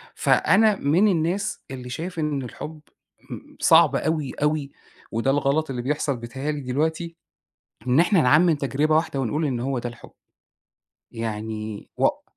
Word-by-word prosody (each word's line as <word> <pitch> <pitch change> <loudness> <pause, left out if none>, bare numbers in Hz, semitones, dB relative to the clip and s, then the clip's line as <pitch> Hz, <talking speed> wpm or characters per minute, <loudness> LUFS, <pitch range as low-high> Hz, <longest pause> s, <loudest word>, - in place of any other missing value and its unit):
فأنا 215 +1 +4
من 175 +5 +2
الناس 185 +3 -1
اللي 125 -2 -7
شايف 170 +7 -5
إن 150 -3 -1
الحُب 150 +5 -8 0.5
آمم - - -10
صعب - - +5
أوي، 155 -4 -1
أوي 150 -2 0 0.4
وده 115 +4 +1
الغلط 145 +2 +1
اللي 125 -2 -3
بيحصل 140 +1 -1
بيتهيأ 130 +5 -4
لي 150 -1 -4
دلوقتي، 160 +6 -2 0.7
إن 125 +5 +4
إحنا 180 0 +4
نعمّم 155 +7 +5
تجربة 145 +2 0
واحدة 155 -3 0
ونقول 145 +5 -1
إن 125 -5 -1
هو 130 +1 -2
ده 120 - -4
الحُب. 120 - -14 1.0
يعني 110 -1 -5
وق - - +1
145 Hz, 145 wpm, -24 LUFS, 125-160 Hz, 1.0 s, صعب